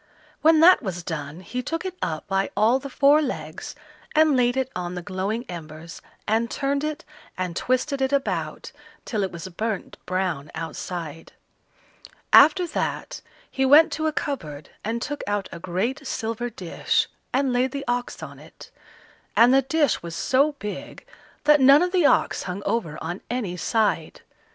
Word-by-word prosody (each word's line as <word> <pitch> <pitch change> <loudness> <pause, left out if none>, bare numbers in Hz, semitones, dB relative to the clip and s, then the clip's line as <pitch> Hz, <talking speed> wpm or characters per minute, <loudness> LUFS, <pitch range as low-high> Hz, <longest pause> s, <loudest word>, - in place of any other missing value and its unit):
When 320 0 +5
that 360 +3 +7
was 180 -7 -4
done, 155 0 -5
he 245 +8 -4
took 330 +7 -4
it 370 -1 -4
up 155 -1 -3
by 195 0 0
all 225 +5 +4
the 275 +1 -8
four 285 +4 +4
legs 280 - -5 0.4
and 310 -2 +5
laid 245 0 +2
it 265 0 -1
on 180 0 -4
the 180 - -5
glowing 195 +7 -3
embers, 165 -1 -9 0.3
and 225 +2 +1
turned 280 +2 -1
it 305 -1 -4 0.3
and 180 -2 -3
twisted 265 - 0
it 265 0 +1
about 280 -1 -2 0.3
till 215 -4 -2
it 190 - -1
was 170 +2 -7
burnt 215 +2 -4
brown 185 -6 -2
outside. 165 -1 -6 1.0
After 355 +5 +7
that, 335 - -3 0.3
he 265 - 0
went 290 +5 +7
to 315 0 -1
a - - +1
cupboard 155 - -5
and 230 +2 -2
took 290 0 -4
out 205 -1 -1
a 170 - -8
great 205 - -2
silver 230 0 -3
dish, 185 -7 -1 0.2
and 265 0 +1
laid 250 +1 +2
the 280 0 -5
ox 245 0 -2
on - - -9
it; - - -14 0.7
and 240 +3 +7
the 270 - +6
dish 290 +3 +1
was 170 -1 -7
so 275 - +2
big 210 - -7 0.4
that 300 -1 +5
none 275 +5 +7
of 360 - -1
the 360 -6 +4
ox - - +2
hung 190 +3 -5
over 200 -8 -1
on 175 +4 -4
any 225 -7 -2
side. 220 +4 0
235 Hz, 170 wpm, -24 LUFS, 180-280 Hz, 1.0 s, that